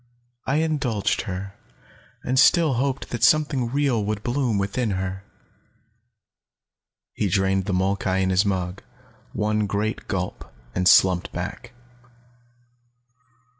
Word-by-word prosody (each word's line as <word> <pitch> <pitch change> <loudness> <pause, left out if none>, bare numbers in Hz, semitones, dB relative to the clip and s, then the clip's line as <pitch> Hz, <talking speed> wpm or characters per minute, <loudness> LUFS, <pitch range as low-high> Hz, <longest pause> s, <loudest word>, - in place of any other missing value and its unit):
I 135 - +1
indulged 145 -10 0
her, 95 +1 -5 0.7
and 130 +1 +1
still 160 +2 +5
hoped 135 +2 -2
that 120 -2 -3
something 145 -5 +3
real 135 -4 +1
would 105 0 -3
bloom 120 -3 0
within 100 +4 -1
her." 95 +1 -4 1.9
He 105 - -1
drained 95 +1 +1
the 100 - -2
molkai 95 0 0
in 95 0 +1
his 95 +2 +3
mug, 95 -2 -2 0.5
one 105 0 0
great 105 +2 -2
gulp, - - -4 0.2
and 90 0 0
slumped 90 -2 +5
back. 100 +8 -6
105 Hz, 115 wpm, -23 LUFS, 95-130 Hz, 1.9 s, still